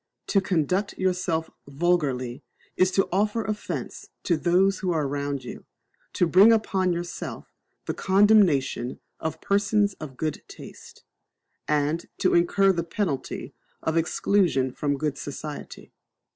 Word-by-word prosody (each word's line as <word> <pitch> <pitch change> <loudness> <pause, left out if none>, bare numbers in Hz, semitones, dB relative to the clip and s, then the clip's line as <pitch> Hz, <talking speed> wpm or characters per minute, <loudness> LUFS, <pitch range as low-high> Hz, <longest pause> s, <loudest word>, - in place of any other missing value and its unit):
To 195 - +3
conduct 185 +2 0
yourself 180 -3 -1 0.2
vulgarly 140 -5 -1 0.3
is 185 - +3
to 195 - +2
offer 210 +4 +1
offence 215 -1 -5 0.2
to 175 - +2
those 185 +4 +2
who 190 - -2
are 155 -3 0
around 140 -1 -3
you; 125 - -9 0.5
to 180 - +2
bring 190 +7 +7
upon 195 -4 +1
yourself 175 0 -5 0.3
the - - -2
condemnation 190 - +3 0.2
of 160 0 -4
persons 200 0 +2
of 135 -5 -8
good 155 +1 -3
taste; - - -13 0.6
and 150 +2 0
to 185 - +2
incur 195 +3 +4
the 170 -2 -1
penalty 170 -5 -3 0.3
of 160 - -1
exclusion 165 -5 +1
from 145 +2 -1
good 145 -1 -2
society. 145 +1 -8
175 Hz, 130 wpm, -25 LUFS, 145-195 Hz, 0.6 s, bring